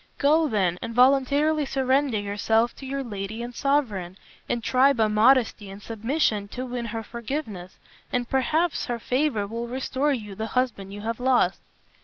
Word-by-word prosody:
Go, 310 Hz, +3 st, +3 dB
then, 185 Hz, -, 0 dB
and 230 Hz, 0 st, -5 dB
voluntarily 280 Hz, +4 st, +4 dB
surrender 265 Hz, -2 st, +1 dB
yourself 220 Hz, +3 st, 0 dB
to 270 Hz, -, -8 dB
your 275 Hz, +1 st, -3 dB
lady 215 Hz, 0 st, -5 dB
and 240 Hz, +1 st, -7 dB
sovereign, 225 Hz, -11 st, -1 dB, 0.3 s
and 235 Hz, -, -1 dB
try 265 Hz, +4 st, +4 dB
by 225 Hz, -4 st, +2 dB
modesty 220 Hz, -1 st, +3 dB
and 195 Hz, +1 st, -9 dB
submission 225 Hz, -1 st, -1 dB
to 255 Hz, +5 st, -6 dB
win 245 Hz, -1 st, -4 dB
her 225 Hz, 0 st, -4 dB
forgiveness, 225 Hz, -6 st, -6 dB, 0.3 s
and 245 Hz, -1 st, -1 dB
perhaps 305 Hz, +7 st, +1 dB
her 240 Hz, -, -2 dB
favor 250 Hz, -2 st, 0 dB
will 230 Hz, +3 st, -5 dB
restore 265 Hz, +3 st, -1 dB
you 215 Hz, -7 st, -4 dB
the 220 Hz, +3 st, -4 dB
husband 220 Hz, -7 st, -1 dB
you 205 Hz, +1 st, -7 dB
have 230 Hz, +2 st, -3 dB
lost." 255 Hz, 0 st, +2 dB
240 Hz, 165 wpm, -25 LUFS, 210-270 Hz, 0.3 s, voluntarily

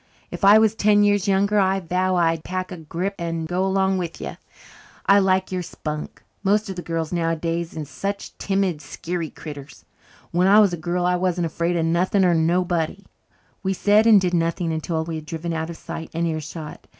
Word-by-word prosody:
If -, -, -7 dB
I 200 Hz, +2 st, +8 dB
was 220 Hz, -1 st, +4 dB
ten 210 Hz, -1 st, +4 dB
years 205 Hz, -1 st, +2 dB
younger 200 Hz, +2 st, +3 dB
I 190 Hz, 0 st, +2 dB
vow 185 Hz, +1 st, 0 dB
I'd 165 Hz, -2 st, +1 dB
pack 185 Hz, 0 st, -4 dB
a 180 Hz, -, -6 dB
grip 170 Hz, +5 st, -3 dB
and 165 Hz, -1 st, -3 dB
go 180 Hz, +3 st, 0 dB
along 190 Hz, 0 st, +1 dB
with 170 Hz, -2 st, -5 dB
you. -, -, -6 dB, 0.7 s
I 200 Hz, +1 st, +6 dB
like 190 Hz, -1 st, +1 dB
your 185 Hz, -1 st, -1 dB
spunk. 150 Hz, -3 st, -6 dB, 0.2 s
Most 205 Hz, +1 st, +1 dB
of -, -, -6 dB
the 175 Hz, -, -5 dB
girls 165 Hz, -1 st, -3 dB
nowadays 165 Hz, 0 st, -2 dB
is 150 Hz, -2 st, -5 dB
such 200 Hz, +6 st, -5 dB
timid, 195 Hz, -5 st, 0 dB
skeery 165 Hz, +3 st, -4 dB
critters. 145 Hz, -3 st, -10 dB, 0.5 s
When 180 Hz, +2 st, +2 dB
I 205 Hz, +2 st, +7 dB
was 200 Hz, -4 st, +4 dB
a -, -, +1 dB
girl 175 Hz, +2 st, -2 dB
I 180 Hz, 0 st, +2 dB
wasn't 180 Hz, -1 st, 0 dB
afraid 170 Hz, +2 st, -1 dB
of 165 Hz, -, +1 dB
nothing 180 Hz, +4 st, +2 dB
or 175 Hz, -, +4 dB
nobody." 175 Hz, +2 st, 0 dB, 0.6 s
We 190 Hz, 0 st, 0 dB
said 210 Hz, +3 st, +4 dB
and 215 Hz, -3 st, +8 dB
did 180 Hz, -1 st, -1 dB
nothing 165 Hz, 0 st, 0 dB
until 160 Hz, 0 st, -2 dB
we 160 Hz, 0 st, -4 dB
had 155 Hz, -1 st, -9 dB
driven 165 Hz, 0 st, -4 dB
out 160 Hz, 0 st, -3 dB
of 170 Hz, -, -7 dB
sight 165 Hz, -, -7 dB
and 170 Hz, +1 st, 0 dB
earshot. 155 Hz, -1 st, -5 dB
175 Hz, 200 wpm, -23 LUFS, 165-190 Hz, 0.7 s, I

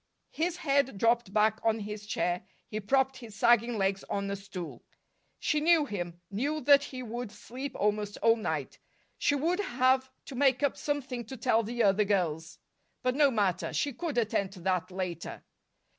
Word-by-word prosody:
His 340 Hz, +2 st, -1 dB
head 280 Hz, -, +1 dB
dropped 230 Hz, -1 st, +2 dB
back 215 Hz, +1 st, +3 dB
on 225 Hz, -1 st, +2 dB
his 210 Hz, 0 st, -6 dB
chair; 180 Hz, -4 st, 0 dB, 0.3 s
he 215 Hz, -, -4 dB
propped 265 Hz, +5 st, +1 dB
his 230 Hz, -5 st, -11 dB
sagging 235 Hz, +1 st, +4 dB
legs 195 Hz, 0 st, 0 dB
on 200 Hz, 0 st, -2 dB
a -, -, -1 dB
stool. 195 Hz, -3 st, -8 dB, 0.6 s
She 305 Hz, -, +1 dB
knew 325 Hz, -1 st, +5 dB
him 175 Hz, -7 st, -5 dB
knew 285 Hz, +10 st, -1 dB
that 280 Hz, +1 st, +6 dB
he 255 Hz, -1 st, -7 dB
would 240 Hz, -1 st, -5 dB
sleep 250 Hz, +6 st, -7 dB
almost 210 Hz, 0 st, 0 dB
all 230 Hz, 0 st, +4 dB
night. 225 Hz, -, -3 dB, 0.4 s
She 285 Hz, -, +2 dB
would 335 Hz, +7 st, 0 dB
have 260 Hz, -6 st, +2 dB, 0.2 s
to -, -, -8 dB
make 260 Hz, 0 st, +2 dB
up 285 Hz, -, +2 dB
something 270 Hz, -4 st, -3 dB
to 260 Hz, +4 st, -8 dB
tell 225 Hz, 0 st, +3 dB
the 235 Hz, +2 st, -1 dB
other 200 Hz, +1 st, +4 dB
girls; 165 Hz, -6 st, -1 dB, 0.5 s
but 255 Hz, 0 st, +2 dB
no 285 Hz, +1 st, +5 dB
matter 200 Hz, -7 st, 0 dB
she 285 Hz, -2 st, 0 dB
could 310 Hz, +1 st, -4 dB
attend 205 Hz, -4 st, 0 dB
to 185 Hz, -, -11 dB
that 185 Hz, 0 st, 0 dB
later. 180 Hz, -3 st, -5 dB
230 Hz, 175 wpm, -30 LUFS, 200-265 Hz, 0.6 s, that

